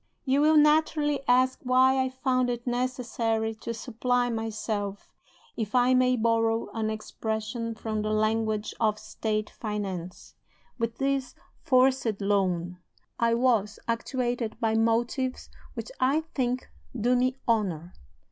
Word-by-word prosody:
"You 270 +1 +3
will 310 +1 +5
naturally 300 -1 +3
ask 255 +1 +3
why 260 +1 +4
I 260 - -1
found 255 -1 0
it 240 -1 -3
necessary 240 -3 -1
to 235 - -4
supply 245 +1 -1
myself 215 -3 -4 0.4
(if 220 0 -3
I 250 +1 +4
may 255 0 +4
borrow 225 -1 +1
an 220 -1 -1
expression 220 +1 -4
from 220 -1 -3
the 215 - -2
language 215 0 0
of 215 -2 +2
State 215 0 -3
finance) 195 -5 -5 0.5
with 230 0 -2
this 270 -1 -1 0.2
'forced 255 -5 +2
loan.' 185 -3 0 0.4
I 230 0 +3
was 230 -4 +2
actuated 240 -1 -2
by 225 -1 +1
motives 235 +3 0 0.2
which - - -6
I 275 +5 +3
think 255 -1 -1 0.3
do 245 +3 +3
me 255 +1 +1
honor. 185 -7 0
230 Hz, 130 wpm, -27 LUFS, 215-255 Hz, 0.5 s, will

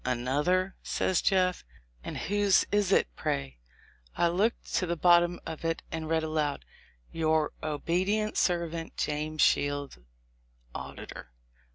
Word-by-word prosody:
"Another?" 145 +10 0
says 185 - 0
Jeff; 185 -2 +2 0.4
"and - - -5
whose 205 -1 +3
egg - - -14
is 205 -2 +2
it, - - +4
pray?" 65 -3 -3 0.6
I 170 - +3
looked 205 +7 -1
to 185 - 0
the 170 - 0
bottom 175 +1 +4
of 160 - -6
it, 165 0 -1
and 160 -1 -4
read 160 -1 +1
aloud, 155 -2 -1 0.5
"Your 160 -1 +1
obedient 185 +8 0
servant, 170 -2 -1
James 155 +1 0
Shields, 145 - +1 0.7
Auditor." 60 - -8
165 Hz, 130 wpm, -29 LUFS, 150-185 Hz, 0.7 s, it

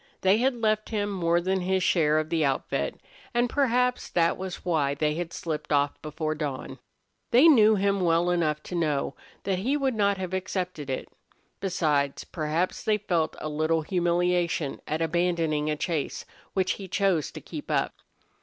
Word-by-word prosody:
They 190 +3 +4
had 260 +1 +2
left 215 -2 0
him 205 -2 -1
more 170 -3 +2
than 190 +2 0
his 185 +1 +1
share 155 -4 +3
of 155 +1 -1
the 165 -2 +2
outfit, 135 -2 -1 0.4
and 240 +1 +3
perhaps 250 -2 +1
that 170 -1 +2
was 190 -1 -6
why 150 -5 +1
they 150 +1 +1
had 170 +1 -4
slipped 160 -3 -4
off 145 -1 +1
before 155 +1 -3
dawn. 140 -4 -5 0.5
They 255 +7 +7
knew 220 -8 +7
him 200 0 +1
well 170 0 +3
enough 155 -4 0
to - - -8
know 150 -5 0 0.3
that 190 -2 0
he 260 +9 +1
would 270 -2 0
not 200 -2 +2
have 185 -1 -5
accepted 185 -5 -3
it. 130 - -3 0.5
Besides, 150 -7 0
perhaps 160 +2 -2
they 215 -1 +2
felt 175 -6 -1
a - - -5
little 155 +1 0
humiliation 175 -3 0
at 155 +2 -1
abandoning 165 -2 0
a 155 - +1
chase 160 -1 -3 0.3
which 190 -1 +1
he 195 - -6
chose 185 -4 +1
to - - -7
keep - - -8
up. - - +1
175 Hz, 175 wpm, -27 LUFS, 155-195 Hz, 0.5 s, They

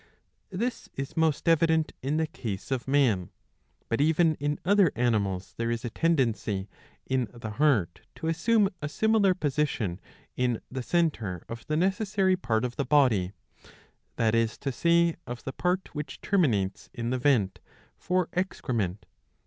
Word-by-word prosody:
This 230 +6 -3
is 135 0 -5
most 160 -1 +1
evident 160 -1 +3
in 140 +4 -1
the 160 - +2
case 110 -7 -6
of 130 -1 -1
man, 125 -11 +2 0.6
but 115 +4 0
even 160 +2 +4
in 145 +1 -1
other 195 -4 +5
animals 100 -6 0
there 115 0 -1
is 115 +1 -2
a 120 - -3
tendency 115 - 0 0.4
in 130 -3 0
the 120 -3 -7
heart 110 - +1
to - - -7
assume 195 +6 +3
a 150 - -3
similar 215 0 +3
position, 140 - -1 0.4
in 125 -2 0
the 130 0 -3
centre 120 - 0
of 115 0 -8
the 155 - 0
necessary 195 +1 +2
part 115 -10 0
of 120 -1 -5
the - - +1
body, 125 -10 +3 0.8
that 110 -1 +2
is 115 -1 +1
to 135 - -3
say 170 +4 +3
of 120 0 -6
the 135 - -5
part 180 +4 -1
which 150 -1 -6
terminates 110 - 0
in 120 +1 -2
the 130 - 0
vent 120 -9 +2 0.4
for 180 -1 0
excrement. 115 - -2
135 Hz, 155 wpm, -28 LUFS, 115-170 Hz, 0.8 s, other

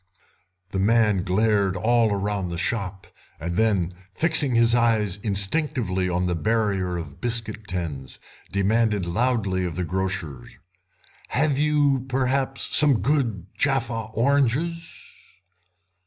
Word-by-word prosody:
The 95 - -2
man 105 -1 +3
glared 100 0 +1
all 115 +4 +2
round 100 -2 -2
the 85 - -4
shop, 95 0 -3 0.3
and 85 +2 -4
then, 95 -5 +1 0.2
fixing 155 -6 +2
his 115 0 +4
eyes 110 -5 +2
instinctively 100 - 0
on 90 +1 0
the 90 - 0
barrier 100 -2 0
of 80 -4 -8
biscuit 110 -3 -4
tins, 80 -8 -5 0.3
demanded 105 0 +1
loudly 100 -1 0
of 85 -3 -3
the 90 - -2
grocer: 95 -6 -3
"You - - -17 1.4
have, 130 - -11
perhaps, 135 +1 -1
some 145 -6 +5
good 120 - 0
Jaffa 120 -5 -1
oranges?" 140 +6 0
105 Hz, 115 wpm, -24 LUFS, 95-120 Hz, 1.4 s, some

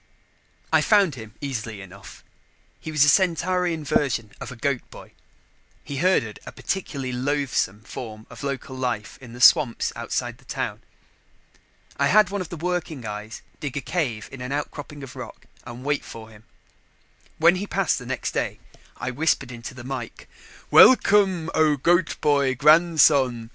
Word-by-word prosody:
I - - +6
found 200 -7 +4
him 110 -4 -10
easily 115 -6 -4
enough. 95 +1 -12 0.6
He 160 - -7
was 150 -2 +4
the - - +4
Centaurian 180 0 +2
version 135 -7 0
of - - -6
a - - -8
goat 130 +2 -1
boy - - -13 0.7
he 140 - -6
herded 140 - +1
a - - -9
particularly 140 -9 -4
loathsome 125 -5 -1
form 110 -1 -8
of - - -12
local 140 -1 -4
life 125 -6 -3
in 120 -3 -11
the 120 - -10
swamps 125 -1 +5
outside - - -3
the - - -22
town. - - -4 1.2
I 140 - +2
had 205 +4 +4
one 200 -1 -2
of 175 - -6
the 170 - -6
working 165 -6 -3
eyes 105 +1 -7 0.2
dig 145 -2 -5
a - - -2
cave 125 -13 -2
in 130 - -9
an 125 +1 -5
outcropping 145 0 -5
of 135 - -10
rock - - -9 0.2
and 120 +2 -9
wait 145 0 0
for 110 -1 -10
him. 105 0 -17 0.9
When 170 +3 +5
he 200 +2 -4
passed 195 -9 0
next 130 +1 -3
day, - - -2 0.4
I 125 +1 -3
whispered 140 -1 0
into 120 +2 -8
the 125 - -9
mike: 125 -3 -7 0.4
"Welcome, 195 -9 +6
O 155 -2 +3
Goat 175 +6 +2
boy 140 -3 +2
Grandson! 145 -5 +4
140 Hz, 160 wpm, -24 LUFS, 120-160 Hz, 1.2 s, I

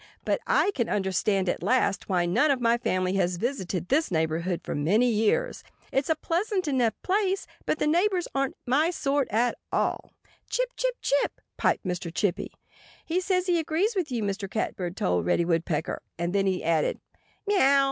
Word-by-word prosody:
But - - 0
I 405 - +3
can 235 -8 -1
understand 190 0 +1
at - - -1
last 215 -6 +1
why 180 -2 +2
none 235 - +3
of 275 -2 +2
my 235 0 +2
family 185 -3 0
has 180 -1 +1
visited 190 - -2
this 310 +4 +2
neighborhood 165 +1 -1
for - - -4
many 200 +12 +2
years. 230 - +1 0.3
It's 270 +2 0
a 320 - +3
pleasant 365 +3 -1
enough 250 -5 +1
place. 390 0 +1 0.2
But - - +1
the - - 0
neighbors 355 +4 +2
aren't 275 -1 -1
my 285 +6 +3
sort 285 -5 0
at 235 +3 +1
all." - - -1 0.4
"Chip, - - 0
chip, - - -1
chip, 285 - +3
chip!" - - -4
piped - - +1
Mr. 180 -2 -3
Chippy. 190 0 -1 0.5
"He 350 +3 0
says 365 -1 +1
he 350 -2 +2
agrees 335 +8 0
with 345 -7 -1
you," 235 -3 -1
Mr. 200 -1 -3
Catbird 180 -4 -3
told 90 -1 0
Reddy 170 - +2
Woodpecker. 165 -2 -1 0.2
And 170 +2 -2
then 195 -1 +2
he 185 -1 0
added, 160 -1 +1 0.5
"Meaow!" 280 -10 +4
235 Hz, 180 wpm, -27 LUFS, -, 0.5 s, Meaow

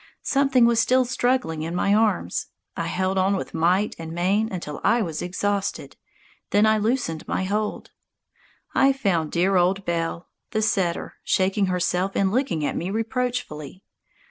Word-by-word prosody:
Something 270 -3 +3
was 235 -1 +3
still 255 +2 +3
struggling 245 -9 0
in 165 +2 -4
my 200 +2 +2
arms. 210 - +1 0.3
I - - -3
held 190 +1 0
on 195 +2 +2
with 190 - -5
might 180 +5 +2
and 160 -1 -6
main 195 +6 +1
until 160 -6 -5
I 235 -1 +3
was 160 -4 -4
exhausted, 200 +2 -2 0.5
then 205 +1 +4
I 215 0 +3
loosed 210 -8 -1
my - - -1
hold. 210 +2 -2 0.8
I 270 0 +4
found 185 - 0
dear 185 +2 +2
old 185 +2 +2
Belle, 170 0 -2 0.3
the 215 0 +1
setter, 185 -5 -1
shaking 195 +1 +1
herself 180 +1 0
and 195 -1 +2
looking 215 - 0
at - - -2
me 175 - -3
reproachfully. 220 - -3
195 Hz, 155 wpm, -24 LUFS, 175-220 Hz, 0.8 s, then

